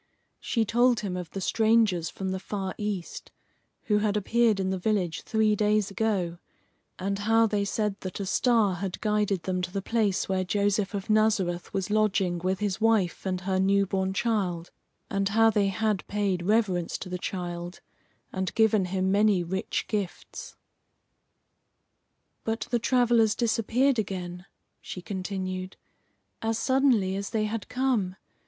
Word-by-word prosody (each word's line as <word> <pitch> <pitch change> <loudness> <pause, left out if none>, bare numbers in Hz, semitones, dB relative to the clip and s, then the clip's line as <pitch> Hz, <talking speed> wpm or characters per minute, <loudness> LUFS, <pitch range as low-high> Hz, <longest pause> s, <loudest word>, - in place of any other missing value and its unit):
She 230 -3 0
told 240 +1 +3
him 195 -4 -3
of 180 -2 -5
the 195 - -5
strangers 220 -4 +2
from 190 -1 -5
the 190 0 -2
far 195 -1 -4
East 205 -4 -4 0.5
who 210 -1 +2
had 210 0 +1
appeared 220 0 +2
in 190 0 0
the 190 - -2
village 185 -4 0
three 220 -1 +2
days 210 -1 +1
ago, 195 -5 -1 0.6
and 195 +2 -2
how 225 +2 +4
they 210 -2 0
said 205 0 -1
that 185 0 -6
a 200 - -2
star 215 -3 +2
had 190 0 -4
guided 210 -4 0
them 185 -1 -1
to 180 0 -4
the 195 - -2
place 215 -4 0
where 190 -1 0
Joseph 205 +2 0
of 200 +1 -3
Nazareth 205 -5 +1
was 195 0 -2
lodging 200 -4 +1
with 185 +3 -1
his 205 0 -1
wife 215 -5 +2
and 185 -1 -2
her 190 0 0
new 195 +1 +3
born 190 0 -1
child, 190 -5 -1 0.4
and 195 0 0
how 225 +2 +4
they 205 -2 +2
had 210 0 -1
paid 200 -3 0
reverence 200 -6 +1
to - - -8
the 180 0 -4
child 175 -1 -5 0.5
and 190 -1 -3
given 220 -3 +3
him 190 +1 0
many 200 -2 +3
rich 190 +3 -2
gifts. 210 - -5 1.9
"But 225 0 -2
the 240 - +2
travellers 235 -2 +3
disappeared 240 +3 +1
again," 180 -2 -5 0.3
she 180 - -8
continued, 185 -1 -4 0.6
"as 225 0 0
suddenly 255 -9 +2
as 200 0 -4
they 220 -2 0
had 215 0 -3
come. 245 -8 0
200 Hz, 155 wpm, -27 LUFS, 185-220 Hz, 1.9 s, how